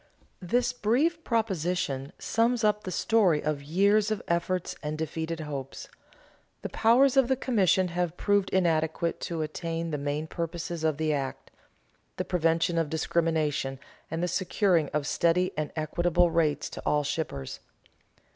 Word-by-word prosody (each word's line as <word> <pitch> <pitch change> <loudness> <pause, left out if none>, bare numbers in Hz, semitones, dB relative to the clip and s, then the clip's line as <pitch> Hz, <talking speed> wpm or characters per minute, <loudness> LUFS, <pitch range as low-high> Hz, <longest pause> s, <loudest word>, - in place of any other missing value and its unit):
_ - - -33 0.4
This 245 +7 +1
brief 285 +9 +1
proposition 180 - -1
sums 230 +1 +1
up 210 0 +2
the 185 - -4
story 190 -6 +2
of 150 -2 -1
years 200 +8 +2
of 215 -2 -1
efforts 170 +1 -1
and 150 0 -3
defeated 160 +1 -3
hopes. 140 -3 -6 0.7
The - - -3
powers 250 +4 +4
of 265 -3 +5
the 265 - +2
commission 190 -7 +2
have 175 0 -2
proved 205 -1 +2
inadequate 165 -2 +1
to 165 -2 -2
attain 165 +1 -4
the 150 - -2
main 145 +2 -2
purposes 170 0 -4
of 155 -2 +1
the 155 -1 0
act 135 -2 -4 0.7
the - - -2
prevention 165 -1 +1
of 160 -3 -1
discrimination 155 -4 0 0.3
and 165 +2 -3
the - - +1
securing 180 -4 +1
of 150 -1 -2
steady 175 +4 +2
and 155 -2 -3
equitable 175 +2 +1
rates 150 -3 +1
to - - -7
all 150 0 +1
shippers. 145 - -4
170 Hz, 150 wpm, -28 LUFS, 155-195 Hz, 0.7 s, of